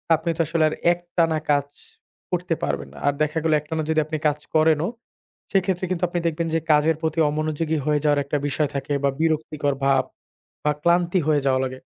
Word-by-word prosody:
আপনি 160 +2 -4
তো - - +2
আসলে 165 0 +1
আর - - -5 0.2
একটানা 170 -2 0
কাজ 145 -1 +2 0.6
করতে 180 -1 -1
পারবেন - - -2
না। - - -14
আর 145 - +4
দেখা 155 +1 -2
গেল 160 -1 +2
একটানা 155 +2 -3
যদি 160 0 +3
আপনি 155 +1 -3
কাজ 150 0 0 0.2
করেনও, 160 +2 +3 0.6
সেক্ষেত্রে 190 -2 +1
কিন্তু 180 -1 -2
আপনি 175 +1 -2
দেখবেন 165 +1 -1
যে - - +3
কাজের 155 +2 +4
প্রতি 160 0 -1
অমনোযোগী 155 +1 -1
হয়ে 150 -1 +2
যাওয়ার 145 -1 +3
একটা 140 +2 -1
বিষয় 145 +1 0
থাকে 140 +1 -2
বা, 140 - +4
বিরক্তিকর 155 -2 0
ভাব 135 -1 +4 0.6
বা, 150 - +2
ক্লান্তি 175 +2 +3
হয়ে 150 -2 +3
যাওয়া 130 -1 +3
লাগে। 130 0 -4
155 Hz, 190 wpm, -23 LUFS, 150-165 Hz, 0.6 s, আর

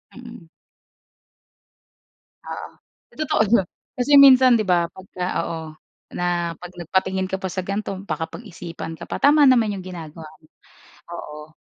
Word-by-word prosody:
Mm. 235 -8 -12 2.0
Oo, - - -6 0.5
totoo 310 -7 +1
naman, 195 -6 +4 0.3
kasi 245 +4 0
minsan 260 -3 +8
'di 220 - +1
ba 175 -3 +2
pagka 185 -1 -8 0.2
oo, 165 - -4 0.6
na 175 -1 -1
'pag 180 +2 -11
nagpatingin 190 +2 -1
ka 190 - -1
pa 190 - -3
sa 185 +1 -3
ganito 200 +2 -3 0.2
baka 155 +1 -2
pag-isipan 170 -6 -8
ka - - -11
pa. - - -4
Tama 290 +1 +5
naman 235 -6 +4
'yong 185 -2 -8
ginagawa 165 -3 -9
mo, 155 - -24 0.7
oo. 150 -1 -9
185 Hz, 140 wpm, -22 LUFS, 170-235 Hz, 2.0 s, minsan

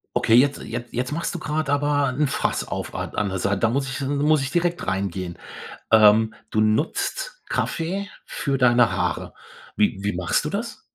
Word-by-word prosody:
Okay, 115 - +4
jetzt 140 +3 +4
jet 120 +1 -5
jetzt 125 +4 -2
machst 165 +2 -2
du 175 - -4
grad 155 -1 -2
aber 145 0 +2
'n 140 +4 0
Fass 130 - -1
auf - - -5
a - - -3
an 105 -2 0
der 95 0 -3
Sei 100 +2 +1
da 110 +3 +1
muss 135 +3 -1
ich 130 - -4
'n 140 +1 -1
muss 150 +1 +3
ich 135 0 -3
direkt 175 +1 0
reingehen. 95 -2 -3 0.5
Ähm, 110 0 +6 0.2
du 110 - +1
nutzt 150 - -1
Kaffee 185 +5 -2 0.2
für 140 -2 -2
deine 120 -2 +4
Haare. 90 -2 -2 0.4
Wie 105 -2 +2
wie 100 0 -1
machst 90 -1 0
du - - -1
das? - - -4
125 Hz, 190 wpm, -23 LUFS, 105-145 Hz, 0.5 s, Ähm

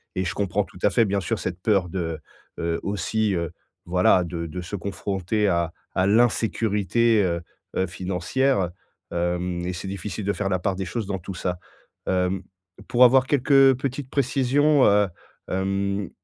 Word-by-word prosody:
et 95 - 0
je 90 - -2
comprends 100 0 0
tout 90 - -15
à 105 - +5
fait 115 - +4
bien 100 0 0
sûr 110 +3 -2
cette 90 0 -4
peur 95 -4 +2
de, 80 -3 -3 0.4
heu, 85 0 -1
aussi, 105 +1 0
heu, 85 -2 -2 0.3
voilà, 90 +1 +4
de 85 -1 -4
de 90 +3 -6
se 90 +4 -6
confronter 100 +2 -1
à 85 -3 +1 0.3
à 95 +1 +3
l'insécurité, 110 -1 +2
heu, 85 -2 -1 0.4
heu, 95 - +2
financière, 95 +5 0 0.4
hem, 90 0 -1
et 90 - -2
c'est 95 +2 -6
difficile 100 +2 -5
de 100 - +2
faire 100 - -2
la 95 - +1
part 95 +1 -1
des 95 0 -3
choses 105 +4 -3
dans 95 -1 -3
tout 95 +2 -7
ça. 90 0 -2 0.5
Hem, 90 0 0 0.4
pour 125 +1 +5
avoir 130 +1 +5
quelques, 145 0 0
heu, 135 -1 +7
petites 135 0 -4
précisions, 140 +2 +3
heu, 100 0 +4 0.4
hem, 100 0 -1
95 Hz, 175 wpm, -24 LUFS, 90-110 Hz, 0.5 s, heu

